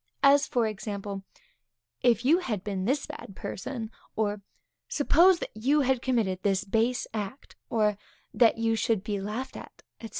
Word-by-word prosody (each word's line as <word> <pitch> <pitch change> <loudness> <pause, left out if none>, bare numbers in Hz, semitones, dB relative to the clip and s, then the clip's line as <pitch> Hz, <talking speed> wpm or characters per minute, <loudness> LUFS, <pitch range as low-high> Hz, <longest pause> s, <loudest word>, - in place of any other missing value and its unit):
As, 280 0 +6
for 240 -2 +1
example; 200 -2 -4 0.8
If 240 0 +3
you 320 +6 +5
had 215 - -3
been 195 -3 -3
this 275 +5 +1
bad 195 - -9
person; 225 +2 -5 0.2
or, 210 -1 -1 0.5
Suppose, 340 +5 +5
that - - -6
you 275 +7 +2
had 260 -2 +1
committed 220 -8 0
this 195 0 +1
base 225 +4 +1
act; 215 +4 -6
or, 210 -3 +1 0.3
that 230 -3 +4
you 225 0 +1
should 220 -2 0
be 205 -2 -2
laughed 215 +7 -4
at, - - -11 0.2
&c. 225 - -7
225 Hz, 160 wpm, -28 LUFS, 205-260 Hz, 0.8 s, As